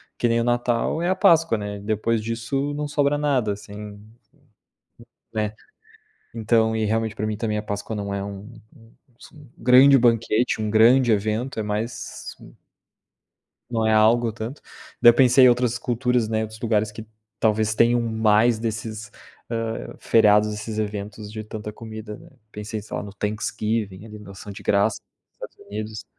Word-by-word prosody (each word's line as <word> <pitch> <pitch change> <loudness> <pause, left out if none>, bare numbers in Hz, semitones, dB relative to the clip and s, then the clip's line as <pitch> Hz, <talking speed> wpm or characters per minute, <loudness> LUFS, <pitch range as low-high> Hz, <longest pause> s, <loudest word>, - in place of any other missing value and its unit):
que 120 - 0
nem 115 0 +2
o - - +1
Natal 120 +5 0
é 175 - 0
a 185 - +2
Páscoa, 165 - +4
né, 105 -1 -5
depois 110 +2 -1
disso 115 +6 -3
não 150 0 -3
sobra 145 0 +1
nada 135 -8 0
assim. 105 0 -10 1.3
Né, 110 -1 -2 0.8
então, 110 0 +1
e 110 - 0
realmente 110 0 -1
para 110 - -3
mim 110 -1 -2
também 110 -1 -2
a 105 - -3
Páscoa 105 +1 -5
não 100 -1 -4
é 100 - -3
um 100 +3 -9 0.2
um 115 0 -20 0.3
s - - -15 0.3
grande 130 +3 +6
banquete, 115 -1 +2
um 110 - -1
grande 115 +2 +5
evento, 110 +5 -1
é - - -1
mais 105 +3 -5
um - - -14 1.2
não 115 -2 0
é 110 - +3
algo 115 +2 +3
tanto, 115 +6 -7 0.4
daí 120 - +9
eu - - +1
pensei 130 0 +6
em - - +8
outras 120 0 +1
culturas 125 -2 0
né, 110 0 0
outros 110 0 -7
lugares 110 -2 0
que 110 +1 -9 0.3
talvez 110 -1 +1
tenham 120 +2 +3
mais 110 0 +2
desses, 110 -1 -5 0.4
hã, 115 -1 -4
feriados 105 -1 +4
desses 105 +1 -5
eventos 105 0 -5
de 110 0 -6
tanta 105 0 -7
comida 110 -1 -9
né, - - -16 0.2
pensei 105 0 -6
sei 105 - -7
lá - - -3
no 100 -1 -9
Thanksgiving 105 -1 -3
ali 105 -1 -10
no 105 -2 -12
ação 100 +1 -10
de 100 - -10
graças, 100 +1 +1 0.4
nos - - -7
Estados - - -20
Unidos, 110 +1 -6
110 Hz, 170 wpm, -23 LUFS, 105-120 Hz, 1.3 s, daí